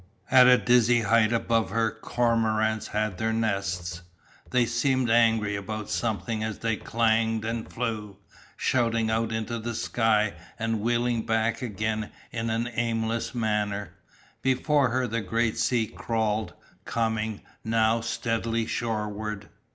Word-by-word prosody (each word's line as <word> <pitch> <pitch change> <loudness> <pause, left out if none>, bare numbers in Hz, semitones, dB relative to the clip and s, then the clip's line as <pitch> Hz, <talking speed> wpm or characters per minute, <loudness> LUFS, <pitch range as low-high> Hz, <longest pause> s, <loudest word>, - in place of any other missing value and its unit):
At 125 -1 +8
a 125 0 +8
dizzy 120 -1 +4
height 115 0 +3
above 115 -1 +1
her 110 +2 +1
cormorants 110 -1 0
had 105 -3 -2
their 110 0 0
nests, 100 -6 -2 0.5
they 125 -1 +3
seemed 125 +1 +1
angry 115 -3 +3
about 105 +1 -5
something 110 0 -1
as 110 -1 -3
they 115 -1 0
clanged 110 0 +1
and 115 0 -4
flew, 110 -4 -4 0.4
shooting 115 -3 +1
out 110 0 0
into 110 +1 -3
the 115 +1 -4
sky 110 -2 +1 0.2
and 115 -1 -1
wheeling 120 +1 +1
back 115 0 +1
again 110 -2 -2 0.2
in 115 -1 -2
an 115 +2 0
aimless 115 0 -1
manner. 105 -3 -1 0.5
Before 135 +2 +2
her 130 +2 0
the 115 -1 -2
grey 115 +3 +1
sea 115 0 +1
crawled, 110 -1 -2 0.3
coming, 110 -2 -1 0.2
now, 115 0 +2
steadily 115 0 -1
shoreward. 105 -2 -3
115 Hz, 130 wpm, -27 LUFS, 110-115 Hz, 0.5 s, At